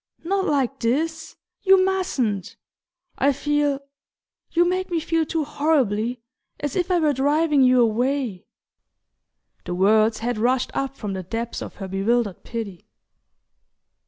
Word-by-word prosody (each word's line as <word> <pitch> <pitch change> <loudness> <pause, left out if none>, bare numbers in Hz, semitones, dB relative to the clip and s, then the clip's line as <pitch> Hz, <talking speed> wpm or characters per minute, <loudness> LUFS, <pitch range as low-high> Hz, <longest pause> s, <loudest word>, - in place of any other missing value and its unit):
"Not 385 +3 0
like 275 -2 0
this 310 +8 -1 0.3
you 380 -1 +5
mustn't! 265 - -1 0.6
I 280 +2 +4
feel 290 0 0 0.7
you 345 +1 +3
make 370 +1 -1
me 340 -2 0
feel 325 0 0
too 325 -2 -1
horribly: 250 -6 0 0.4
as 290 -2 -3
if 365 0 0
I 365 - +3
were 310 -3 +2
driving 290 +2 +2
you 255 -1 +5
away..." 240 -2 0 1.2
The 175 - -3
words 215 +4 +3
had 240 -1 -2
rushed 245 +2 +1
up 275 0 -2
from 205 -2 -4
the 190 - -3
depths 230 +6 -4
of - - -7
her 195 - -6
bewildered 200 +2 0
pity. 210 -7 -6
265 Hz, 135 wpm, -23 LUFS, 225-315 Hz, 1.2 s, you